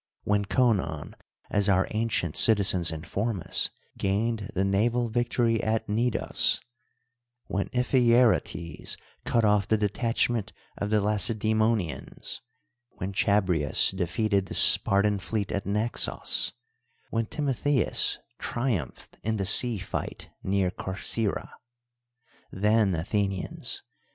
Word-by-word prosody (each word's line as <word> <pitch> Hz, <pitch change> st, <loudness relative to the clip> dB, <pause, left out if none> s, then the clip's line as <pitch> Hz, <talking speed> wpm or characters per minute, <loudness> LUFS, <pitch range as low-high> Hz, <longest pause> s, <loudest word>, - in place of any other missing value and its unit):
when 105 Hz, 0 st, +1 dB
Conon 95 Hz, -, 0 dB, 0.4 s
(as 100 Hz, 0 st, +1 dB
our 95 Hz, -1 st, +3 dB
ancient 110 Hz, -7 st, -1 dB
citizens 95 Hz, -5 st, +4 dB
inform 95 Hz, +7 st, -3 dB
us) -, -, +1 dB, 0.3 s
gained 105 Hz, +2 st, -1 dB
the 95 Hz, +1 st, +1 dB
naval 115 Hz, +5 st, +1 dB
victory 120 Hz, 0 st, 0 dB
at 110 Hz, 0 st, -1 dB
Cnidos; 115 Hz, +3 st, 0 dB, 0.9 s
when 100 Hz, +1 st, -2 dB
Iphicrates 120 Hz, -, +1 dB, 0.3 s
cut 115 Hz, -2 st, +1 dB
off 105 Hz, -2 st, +2 dB
the 110 Hz, -, +2 dB
detachment 110 Hz, +1 st, -1 dB, 0.2 s
of 105 Hz, -, -4 dB
the 110 Hz, 0 st, +2 dB
Laceda}monians, 110 Hz, -, -1 dB, 0.5 s
when 95 Hz, +2 st, -6 dB
Chabrias 90 Hz, -8 st, +3 dB
defeated 100 Hz, +2 st, 0 dB
the -, -, -5 dB
Spartan 100 Hz, +1 st, +6 dB
fleet 100 Hz, +2 st, -3 dB
at 100 Hz, -, -3 dB
Xaxos; 105 Hz, +4 st, -1 dB, 0.6 s
when 115 Hz, -1 st, -1 dB
Timotheus 145 Hz, -1 st, 0 dB, 0.2 s
triumphed 115 Hz, -, -4 dB
in 110 Hz, +1 st, -1 dB
the 100 Hz, -2 st, -2 dB
sea 115 Hz, +3 st, +5 dB
fight 95 Hz, -, -6 dB
near 95 Hz, -1 st, 0 dB
Corcyra. 100 Hz, +3 st, -3 dB, 1.0 s
Then, 105 Hz, -1 st, +2 dB
Athenians 95 Hz, +3 st, -3 dB
105 Hz, 105 wpm, -27 LUFS, 95-115 Hz, 1.0 s, Spartan